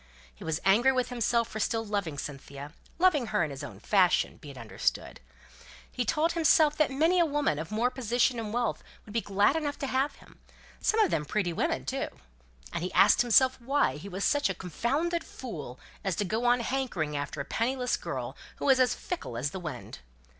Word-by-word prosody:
He - - -13
was 160 0 -1
angry 230 +7 +5
with 255 -1 0
himself 235 -1 +1
for 220 - -6
still 225 +1 0
loving 200 -8 -2
Cynthia; 140 +1 -7 0.2
loving 325 -8 +3
her 210 -5 +1
in 155 - -3
his 135 - -7
own - - -8
fashion, 185 -4 +2
be 150 - -12
it 135 - -10
understood. 115 -3 -2 0.7
He 245 - -2
told 310 +9 +1
himself 315 -2 +4
that 305 - +3
many 320 +7 +2
a 340 - +5
woman 290 - 0
of 160 - -5
more 230 +4 +1
position 245 0 +1
and 215 -2 -4
wealth 240 0 -1 0.2
would 205 - -11
be 230 - +1
glad 205 +7 +2
enough 295 -3 -2
to - - -3
have 265 +2 0
him; - - -19 0.4
some 440 - +1
of 420 - +3
them 150 - +1
pretty 175 +2 -1
women - - -1
too. - - -2 0.7
And - - -2
he 180 - -3
asked 205 - +6
himself 255 +2 +4
why 270 - +1
he 195 +7 -8
was 195 +1 -4
such 290 0 +2
a - - -2
confounded 290 - -1
fool 150 - -8 0.2
as 190 -3 -1
to 205 - -1
go 220 +5 -1
on 245 0 +4
hankering 235 - -2
after 145 +1 -4
a 140 - -3
penniless 250 +6 0
girl, - - -5 0.2
who - - -5
was 265 -2 +5
as 250 -2 +3
fickle 230 - -5
as 140 +5 -1
the 190 - -5
wind? 150 - -7
230 Hz, 205 wpm, -29 LUFS, 175-265 Hz, 0.7 s, asked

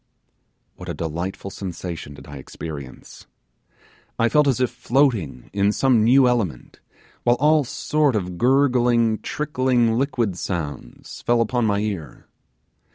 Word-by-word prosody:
What - - -9
a - - -3
delightful 85 +4 -4
sensation 85 -6 -6
did - - -13
I 75 -1 -9
experience! 70 -1 -9 0.9
I 115 0 +2
felt 150 +4 +3
as 130 -3 +1
if 125 -1 +1
floating 120 - 0
in 100 0 +2
some 120 -1 +3
new 130 +3 +5
element, 110 - -2 0.4
while 120 0 +3
all 150 +1 +4
sort 145 +1 0
of 90 -3 -3
gurgling, 120 -3 +3
trickling, 130 -6 0
liquid 120 -9 -1
sounds 85 -6 -6
fell 120 0 +2
upon 115 0 +1
my 100 -1 +1
ear. 95 - -5
115 Hz, 130 wpm, -22 LUFS, 90-130 Hz, 0.9 s, new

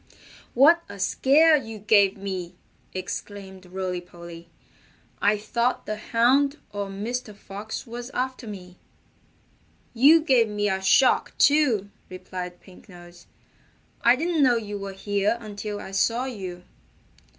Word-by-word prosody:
"What 310 +7 +6
a 200 - -9
scare 295 +11 +4
you 225 -6 -4
gave 205 -1 +3
me!" 185 -3 -5 0.4
exclaimed 190 0 -7
Rolly 180 -1 -4
Polly. 170 -1 -12 0.7
"I 210 +1 +3
thought 235 +4 -1
the 215 - -3
Hound 255 +6 +2
or 205 -1 -4
Mr. 210 +3 -5
Fox 205 +4 -7
was 240 +1 -7
after 255 -2 -4
me." 180 -3 -10 1.2
"You 285 +7 +6
gave 255 -7 +3
me 210 -1 -1
a 190 -1 -1
shock, 255 +7 +3
too," 255 -10 +3 0.2
replied 180 -1 -8
Pink 190 +2 -18
Nose. 175 -1 -15 0.7
"I 235 +1 +5
didn't 325 +2 0
know 255 -3 +5
you 205 -2 -5
were 195 0 -6
here 205 +3 -1
until 210 -1 -6
I - - -9
saw 230 +6 +1
you." 185 -8 -7
205 Hz, 130 wpm, -25 LUFS, 190-245 Hz, 1.2 s, What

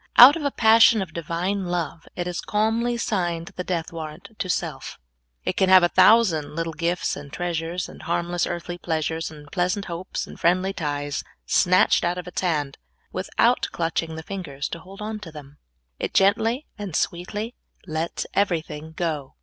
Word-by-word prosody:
Out 260 +5 +11
of 330 - -4
a 285 - +2
pas.sion 225 -2 +6
of 160 -5 -11
Divine 175 +4 -2
love, 170 -2 -3
it 175 - -2
has 175 -1 -3
calmly 225 +3 0
signed 175 -5 -1
the 180 - -3
death 175 -1 -3
warrant 160 +4 -7
of 185 - -1
self. 155 -7 -4 0.5
It - - 0
can 190 - +3
have 185 -1 +8
a 175 - +4
thousand 185 -7 +4
little 165 0 -2
gifts 170 +2 -1
and 140 -1 -9
treasures, 175 +1 -2
and - - -12
harmless 175 0 -1
earthly 175 0 -5
pleasures, 160 -1 -2
and 150 -2 -13
pleasant 185 +2 0
hopes, 175 +1 -4
and - - -12
friendly 185 +3 +2
ties 145 -3 -3 0.2
snatched 185 0 +4
out 175 +1 0
of 180 -1 -6
its 180 - -3
hand, 150 -6 -1 0.3
without - - +1
clutching 165 0 -2
the 160 - -7
fingers 155 -7 -5
to 170 - -5
hold 195 +4 -10
on 215 0 -4
to 180 -6 -9
them. 145 -1 -12 0.4
It - - -3
gently 225 +8 +3
and 195 -6 -5
sweetly 205 +7 -2 0.3
lets 160 0 -3
everything 160 -5 -1
go. 155 -5 -3
175 Hz, 175 wpm, -24 LUFS, 160-195 Hz, 0.5 s, Out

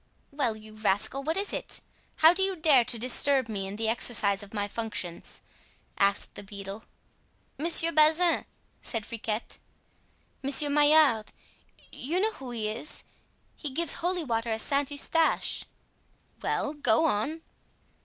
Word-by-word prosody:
"Well, 270 -6 -1
you 215 0 -13
rascal, 215 +5 0
what 320 +5 -2
is 400 +1 -1
it? - - -4 0.4
How 320 +2 +6
do 370 - -2
you 385 0 0
dare 305 -7 +4
to 235 - 0
disturb 260 +2 +2
me 200 -3 -4
in 195 - -6
the 220 +1 -2
exercise 220 -3 +3
of 205 -1 -11
my 205 -2 -2
functions?" 205 -5 -5 0.6
asked 200 0 +2
the - - -8
beadle. 200 +1 -9 0.7
"Monsieur 335 +1 +2
Bazin," 320 +2 +4 0.4
said 225 -3 -2
Friquet, 230 -1 -4 0.8
"Monsieur 280 +2 +1
Maillard—you 295 +1 +1
know 435 +3 +2
who 270 - -10
he 225 -3 -3
is, 230 +8 -7 0.5
he 300 - -5
gives 315 +3 +3
holy 350 0 -1
water 230 -4 -2
at 220 0 -1
Saint 280 +2 0
Eustache——" 315 +3 0 0.8
"Well, 295 - -1
go 295 0 +2
on." 310 +5 -1
260 Hz, 140 wpm, -28 LUFS, 215-310 Hz, 0.8 s, How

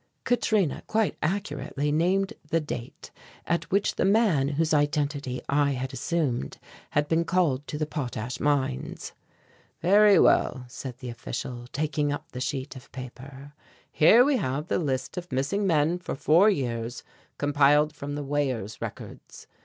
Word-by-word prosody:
Katrina 215 - +1
quite 220 -1 +1
accurately 150 -4 -2
named 185 +5 +1 0.2
the 165 - +2
date 125 -6 -7 0.3
at 170 - -1
which 200 +2 +1
the - - +1
man 195 -8 +3
whose 155 +3 0
identity 145 -3 0
I 140 0 +2
had 130 +1 -4
assumed 145 -4 -2 0.3
had 145 0 +1
been 165 +2 +2
called 165 -6 +1
to 150 - -4
the 155 - -1
potash 125 -6 -4
mines. 140 -3 -1 0.7
"Very 200 +2 +6
well," 130 -5 +3
said 125 0 -8
the 125 -1 -7
official, 120 +1 -6
taking 150 0 -1
up 145 - -6
the 125 - -6
sheet 135 +1 -3
of 130 +2 -13
paper, 135 +2 -10 0.4
"here 225 +11 +6
we 285 -2 +3
have 145 - -2
the - - +1
list 135 0 -2
of 180 -2 -6
missing 145 +11 0
men 165 +1 +2
for 180 - -5
four 160 +8 +5
years 120 - -2 0.3
compiled 145 +1 +3
from 145 -1 -6
the 145 - -4
weighers' 130 -7 -2
records. - - -8
145 Hz, 150 wpm, -26 LUFS, 130-170 Hz, 0.7 s, Very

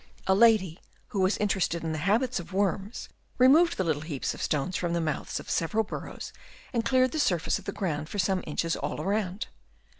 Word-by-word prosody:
A 190 - +4
lady, 200 -5 +4 0.3
who 200 - -3
was 185 +2 +2
in 210 - +1
terested 175 -4 0
in 160 - -2
the 155 - -2
habits 225 - +1
of 175 - -9
worms, 195 +3 -1 0.3
removed 305 +7 +5
the 190 - +1
little 155 -4 0
heaps 150 -4 -3
of - - -8
stones 155 +5 -1
from 175 -1 -1
the 170 - +1
mouths 155 -3 -2
of - - -11
several 215 +7 +1
burrows 215 - -7 0.4
and 235 -2 +1
cleared 255 +1 +3
the 315 - -2
surface 175 - +1
of - - -15
the - - -2
ground 155 -6 -3
for - - -5
some 190 -1 +1
inches 165 +2 -1
all - - -3
round. 200 0 -1
190 Hz, 210 wpm, -28 LUFS, 165-220 Hz, 0.4 s, removed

